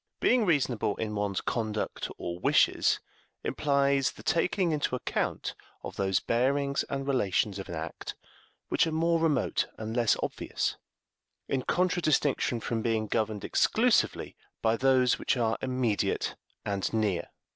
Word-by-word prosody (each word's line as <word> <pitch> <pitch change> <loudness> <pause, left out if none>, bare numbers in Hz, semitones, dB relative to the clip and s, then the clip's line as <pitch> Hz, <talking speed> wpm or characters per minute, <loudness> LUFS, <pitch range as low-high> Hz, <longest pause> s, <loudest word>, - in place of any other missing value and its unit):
Being 245 -5 +3
reasonable 130 -10 +1
in 110 -1 -3
one's 100 -2 -1
conduct 110 -3 -2
or 85 0 -5
wishes - - +3 0.4
implies 140 -2 +1
the - - -13
taking 175 +2 +1
into 145 -4 0
account 125 - -2 0.3
of - - -7
those 95 -2 +1
bearings 140 +4 +1
and 135 0 -3
relations 105 -6 +1
of 95 - -7
an 85 - -4
act 80 0 -6 0.5
which - - +3
are - - -2
more 165 +1 +2
remote 155 -5 +1
and 110 +1 -5
less 120 -3 +3
obvious, - - -2 0.7
in 135 - 0
contradistinction 155 -7 +1
from 115 0 -2
being 110 -1 0
governed 110 -1 -1
exclusively - - +2 0.3
by 110 0 +3
those 130 0 +3
which - - 0
are 115 -2 +1
immediate 125 -5 0 0.3
and 100 -2 -1
near. 105 -5 0
120 Hz, 135 wpm, -29 LUFS, 105-140 Hz, 0.7 s, Being